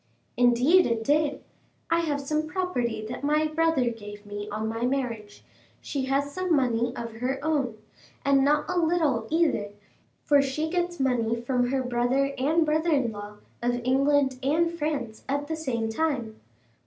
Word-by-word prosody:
"Indeed 250 Hz, +9 st, +5 dB
it 230 Hz, -1 st, -1 dB
did. 290 Hz, +2 st, +1 dB, 0.5 s
I 335 Hz, -, +4 dB
have 300 Hz, -4 st, -1 dB
some 305 Hz, +2 st, -1 dB
property 250 Hz, -, -2 dB
that 245 Hz, +4 st, -6 dB
my 300 Hz, +2 st, +2 dB
brother 310 Hz, -5 st, +1 dB
gave 205 Hz, -2 st, -10 dB
me 205 Hz, 0 st, -6 dB
on 215 Hz, +1 st, -3 dB
my 225 Hz, +1 st, -3 dB
marriage; 240 Hz, -5 st, -3 dB, 0.4 s
she 275 Hz, -2 st, -3 dB
has 275 Hz, +2 st, 0 dB
some 370 Hz, -1 st, +1 dB
money 240 Hz, -3 st, +1 dB
of 230 Hz, -1 st, -6 dB
her 255 Hz, +3 st, -1 dB
own, 275 Hz, -8 st, 0 dB, 0.5 s
and 275 Hz, -1 st, +4 dB
not 295 Hz, +1 st, +2 dB
a 360 Hz, -, 0 dB
little 315 Hz, -9 st, +1 dB
either, 320 Hz, -11 st, +1 dB, 0.5 s
for 285 Hz, -1 st, +5 dB
she 300 Hz, +4 st, -2 dB
gets 350 Hz, -1 st, -1 dB
money 235 Hz, -3 st, +1 dB
from 245 Hz, 0 st, 0 dB
her 265 Hz, 0 st, 0 dB
brother 250 Hz, +3 st, +1 dB
and 315 Hz, +5 st, +2 dB
brother 315 Hz, +2 st, +1 dB
in 270 Hz, -7 st, +2 dB
law 205 Hz, 0 st, -8 dB, 0.3 s
of 245 Hz, 0 st, 0 dB
England 270 Hz, +1 st, +2 dB
and 320 Hz, +5 st, +2 dB
France 295 Hz, -9 st, -3 dB
at 285 Hz, +1 st, 0 dB
the 320 Hz, +2 st, -3 dB
same 250 Hz, -8 st, -2 dB
time. 235 Hz, -3 st, -2 dB
270 Hz, 165 wpm, -26 LUFS, 235-305 Hz, 0.5 s, Indeed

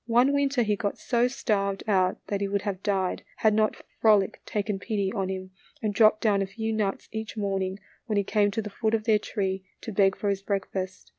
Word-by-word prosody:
One 245 Hz, +4 st, +4 dB
winter 280 Hz, -3 st, +2 dB
he 210 Hz, -1 st, +1 dB
got 205 Hz, 0 st, -2 dB
so 240 Hz, 0 st, +2 dB
starved 200 Hz, -6 st, -1 dB
out 185 Hz, -3 st, +2 dB
that 200 Hz, -1 st, -2 dB
he 200 Hz, -, +1 dB
would 200 Hz, 0 st, -1 dB
have 200 Hz, -3 st, -3 dB
died, 195 Hz, -3 st, 0 dB
had 215 Hz, -1 st, +3 dB
not 215 Hz, 0 st, +1 dB, 0.2 s
Frolic 210 Hz, -3 st, +4 dB
taken 205 Hz, -1 st, -1 dB
pity 200 Hz, -2 st, -1 dB
on 195 Hz, -4 st, -1 dB
him 185 Hz, 0 st, -5 dB, 0.3 s
and 215 Hz, -5 st, -1 dB
dropped 215 Hz, +1 st, +5 dB
down 205 Hz, -3 st, +3 dB
a 195 Hz, -, -1 dB
few 220 Hz, +3 st, -3 dB
nuts 205 Hz, -3 st, -1 dB
each 220 Hz, 0 st, -5 dB
morning 195 Hz, -2 st, -1 dB, 0.3 s
when 215 Hz, -3 st, 0 dB
he 200 Hz, -, +3 dB
came 205 Hz, +1 st, +2 dB
to 215 Hz, +2 st, -2 dB
the 210 Hz, -, -6 dB
foot 220 Hz, +2 st, 0 dB
of 220 Hz, -, -2 dB
their 215 Hz, -1 st, +4 dB
tree 190 Hz, -2 st, -2 dB, 0.2 s
to 225 Hz, -, -6 dB
beg 195 Hz, -1 st, +3 dB
for 205 Hz, -, -1 dB
his 195 Hz, -1 st, -2 dB
breakfast. 190 Hz, -2 st, -3 dB
205 Hz, 220 wpm, -27 LUFS, 195-220 Hz, 0.3 s, dropped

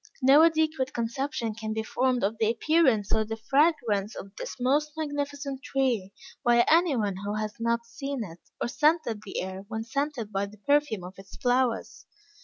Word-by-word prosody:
No 275 Hz, +4 st, +7 dB
adequate 315 Hz, -5 st, +2 dB
conception 235 Hz, 0 st, -2 dB
can 215 Hz, 0 st, -4 dB
be 220 Hz, 0 st, -2 dB
formed 255 Hz, +2 st, 0 dB
of 210 Hz, +3 st, 0 dB
the 220 Hz, -, +3 dB
appearance 250 Hz, -5 st, +2 dB
or 220 Hz, -1 st, +2 dB
the 225 Hz, +1 st, -5 dB
fragrance 230 Hz, -, +1 dB
of 200 Hz, +1 st, -9 dB
this -, -, -6 dB
most 290 Hz, +4 st, +1 dB
magnificent 285 Hz, -2 st, -3 dB
tree, 250 Hz, -9 st, 0 dB, 0.3 s
by 235 Hz, 0 st, +5 dB
any 330 Hz, -2 st, +4 dB
one 205 Hz, -5 st, -1 dB
who 205 Hz, +2 st, -4 dB
has 215 Hz, 0 st, -3 dB
not 235 Hz, 0 st, 0 dB
seen 275 Hz, +1 st, -4 dB
it 170 Hz, -4 st, -10 dB, 0.2 s
or -, -, -1 dB
scented 295 Hz, -5 st, +1 dB
the 195 Hz, -, -4 dB
air 190 Hz, +1 st, -5 dB
when 220 Hz, 0 st, -4 dB
scented 250 Hz, -2 st, -3 dB
by 195 Hz, 0 st, -1 dB
the 210 Hz, +1 st, -14 dB
perfume 285 Hz, -4 st, +1 dB
of 185 Hz, +2 st, -10 dB
its 195 Hz, 0 st, -12 dB
flowers. 250 Hz, -1 st, 0 dB
235 Hz, 180 wpm, -27 LUFS, 215-285 Hz, 0.3 s, No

